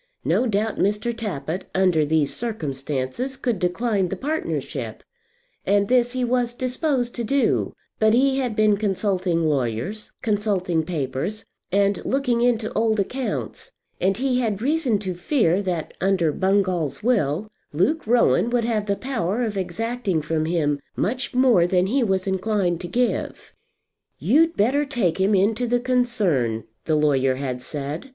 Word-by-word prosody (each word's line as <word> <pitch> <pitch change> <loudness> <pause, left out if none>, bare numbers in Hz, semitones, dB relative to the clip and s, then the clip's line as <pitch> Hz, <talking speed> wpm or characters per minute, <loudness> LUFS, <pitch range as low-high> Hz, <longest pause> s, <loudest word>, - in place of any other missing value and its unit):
No 255 - +2
doubt 215 0 -1
Mr. 210 +4 0
Tappitt, 180 -6 -4
under 185 -5 +3
these 155 -2 +2
circumstances, 150 - -3
could 235 -6 -1
decline 190 +1 0
the - - -3
partnership; 310 +3 -4 0.6
and 200 0 +2
this 245 -1 +3
he 255 -1 0
was 240 -1 0
disposed 255 -1 -1
to 240 - -3
do; 275 +4 +1 0.3
but 220 +1 +4
he 270 +2 +3
had 245 -5 -2
been 215 -2 +3
consulting 190 -4 0
lawyers, 145 - -1
consulting 200 -6 +1
papers, 160 +5 -3 0.3
and 200 +1 +2
looking 250 -3 0
into 235 -3 +1
old 220 -1 +1
accounts, 260 - -3 0.3
and 195 +1 +1
he 255 -1 +1
had 215 -5 -1
reason 270 -2 +1
to 190 -2 -4
fear, 180 - +1
that 175 -5 -3
under 185 -5 +2
Bungall's 185 -7 0
will, 210 - +1 0.2
Luke 215 - 0
Rowan 235 0 +3
would 240 -1 +1
have 215 -3 -1
the 200 - +1
power 235 -3 -2
of 215 -3 -2
exacting 195 -1 -2
from 155 0 -1
him 155 -4 0 0.2
much 250 +4 -2
more 245 -9 +5
than 180 0 +2
he 255 +8 +1
was 190 -5 +1
inclined 190 -2 0
to 175 - -5
give. 240 +7 -2 0.6
"You'd 330 +3 +3
better 260 +8 +3
take 225 - 0
him 200 +2 +3
into 220 +5 +2
the 245 +1 +2
concern," 210 - +1 0.2
the 155 - +1
lawyer 135 -3 +2
had 130 -2 -4
said. 150 - -5
205 Hz, 150 wpm, -23 LUFS, 175-245 Hz, 0.6 s, more